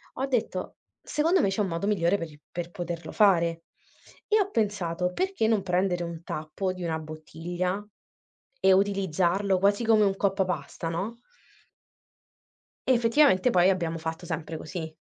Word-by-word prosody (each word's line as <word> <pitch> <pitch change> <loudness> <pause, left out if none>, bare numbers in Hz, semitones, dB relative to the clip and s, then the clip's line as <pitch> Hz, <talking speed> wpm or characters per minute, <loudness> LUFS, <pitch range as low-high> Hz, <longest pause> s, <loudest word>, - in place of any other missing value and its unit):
ho 265 - -1
detto: 230 -8 -2 0.3
"Secondo 330 +5 +2
me 195 - +2
c'è 195 - -2
un 200 - +1
modo 170 +3 -3
migliore 200 -2 +2
per 165 -3 -5
i 145 - -17
per 175 0 -5
poterlo 170 -2 -5
fare." 170 -5 +3 0.6
E 430 -2 +3
ho 400 0 +1
pensato: 180 - -1
"Perché 375 - 0
non 220 -2 +2
prendere 180 -1 0
un 170 -1 -7
tappo 155 +5 -3
di 185 - -7
una 160 -2 -1
bottiglia 170 +5 -4 0.8
e 190 - +5
utilizzarlo 190 0 +2
quasi 200 +4 +2
come 220 -2 +5
un 195 -1 +1
coppapasta, 185 -6 -1
no?" 195 +8 -3 1.7
Effettivamente 245 -2 +4
poi 185 -2 +5
abbiamo 170 -3 -1
fatto 160 +2 -5
sempre 160 -1 -4
così. 160 0 -6
185 Hz, 145 wpm, -27 LUFS, 170-205 Hz, 1.7 s, e